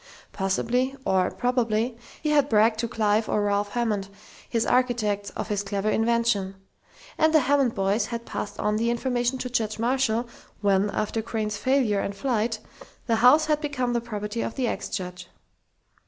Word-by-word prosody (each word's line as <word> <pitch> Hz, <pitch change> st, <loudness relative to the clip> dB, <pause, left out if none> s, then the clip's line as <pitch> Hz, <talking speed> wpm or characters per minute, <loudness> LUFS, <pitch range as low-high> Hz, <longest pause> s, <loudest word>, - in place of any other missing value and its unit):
Possibly, 240 Hz, +7 st, 0 dB
or 185 Hz, -1 st, +2 dB
probably, 240 Hz, -1 st, 0 dB, 0.3 s
he 305 Hz, -, +1 dB
had 290 Hz, -2 st, +3 dB
bragged 220 Hz, 0 st, +4 dB
to 235 Hz, -, 0 dB
Clive 215 Hz, -1 st, +1 dB
or 210 Hz, -, +1 dB
Ralph 205 Hz, 0 st, 0 dB
Hammond, 215 Hz, -5 st, -1 dB, 0.4 s
his 230 Hz, -2 st, 0 dB
architects, 220 Hz, -5 st, +1 dB
of -, -, -4 dB
his 205 Hz, -1 st, 0 dB
clever 200 Hz, +1 st, -1 dB
invention. 225 Hz, -4 st, +1 dB, 0.6 s
And 315 Hz, 0 st, +4 dB
the 310 Hz, -, +7 dB
Hammond 275 Hz, -2 st, +2 dB
boys 195 Hz, +2 st, +1 dB
had 235 Hz, -1 st, -5 dB
passed 205 Hz, 0 st, -5 dB
on 210 Hz, 0 st, +1 dB
the 230 Hz, +2 st, +1 dB
information 245 Hz, +1 st, 0 dB
to 255 Hz, -, -4 dB
Judge 220 Hz, -3 st, -1 dB
Marshall, 240 Hz, 0 st, +1 dB, 0.3 s
when, 200 Hz, 0 st, +2 dB
after 215 Hz, +2 st, -2 dB
Crain's 215 Hz, -2 st, -3 dB
failure 250 Hz, -4 st, +2 dB
and 200 Hz, 0 st, -3 dB
flight, 225 Hz, 0 st, 0 dB, 0.5 s
the 230 Hz, -2 st, +1 dB
house 255 Hz, +7 st, +6 dB
had 300 Hz, -1 st, +1 dB
become 255 Hz, -5 st, -1 dB
the 235 Hz, -, 0 dB
property 215 Hz, -1 st, -4 dB
of -, -, -3 dB
the 255 Hz, -2 st, 0 dB
ex -, -, -3 dB
judge. 180 Hz, -3 st, -5 dB
225 Hz, 170 wpm, -25 LUFS, 205-245 Hz, 0.6 s, the